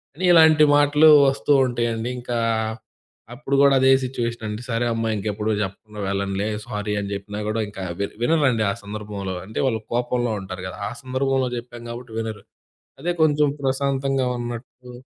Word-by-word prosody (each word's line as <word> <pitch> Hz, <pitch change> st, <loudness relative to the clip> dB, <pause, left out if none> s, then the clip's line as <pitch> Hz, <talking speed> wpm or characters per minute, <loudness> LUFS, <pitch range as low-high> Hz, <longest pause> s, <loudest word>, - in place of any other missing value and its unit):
అని 185 Hz, +3 st, -2 dB
ఇలాంటి 160 Hz, -2 st, +7 dB
మాటలు 145 Hz, +2 st, +5 dB, 0.2 s
వస్తూ 140 Hz, +1 st, +1 dB
ఉంటాయండి. 120 Hz, -1 st, -2 dB
ఇంకా 120 Hz, -1 st, -3 dB, 1.0 s
అప్పుడు 140 Hz, +1 st, -2 dB
గూడా 140 Hz, -1 st, +6 dB
అదే 130 Hz, 0 st, +6 dB
సిట్యుయేషనండి. 115 Hz, -3 st, -4 dB
"సరే 115 Hz, +1 st, 0 dB
అమ్మా! 115 Hz, 0 st, -1 dB
ఇంకెప్పుడూ 105 Hz, +1 st, -2 dB
చెప్పకుండా 105 Hz, +2 st, -8 dB
వెళ్ళనులే. 100 Hz, +1 st, -1 dB, 0.2 s
సారీ." 105 Hz, -2 st, -3 dB
అని 100 Hz, 0 st, -5 dB
చెప్పినా 105 Hz, +1 st, -6 dB
గూడా, 110 Hz, +1 st, -1 dB
ఇంకా 95 Hz, -2 st, -7 dB, 0.2 s
వి 100 Hz, -, 0 dB, 0.2 s
వినరండి 130 Hz, -7 st, +2 dB
ఆ -, -, -2 dB
సందర్భంలో. 100 Hz, -2 st, -5 dB
అంటే, 110 Hz, -, -5 dB
వాళ్ళు 110 Hz, -3 st, -1 dB
కోపంలో 120 Hz, -1 st, 0 dB
ఉంటారు 95 Hz, -1 st, -7 dB
గదా! 95 Hz, -, -8 dB
ఆ -, -, -8 dB
సందర్భంలో 130 Hz, 0 st, 0 dB
జెప్పాం 120 Hz, 0 st, -9 dB
గాబట్టి 120 Hz, -1 st, -9 dB
వినరు, 110 Hz, -3 st, -5 dB, 0.6 s
అదే 175 Hz, +3 st, 0 dB
కొంచెం 150 Hz, -1 st, +4 dB
ప్రశాంతంగా 135 Hz, -1 st, 0 dB
ఉన్నట్టు 120 Hz, +1 st, -7 dB
120 Hz, 150 wpm, -22 LUFS, 105-135 Hz, 1.0 s, ఇలాంటి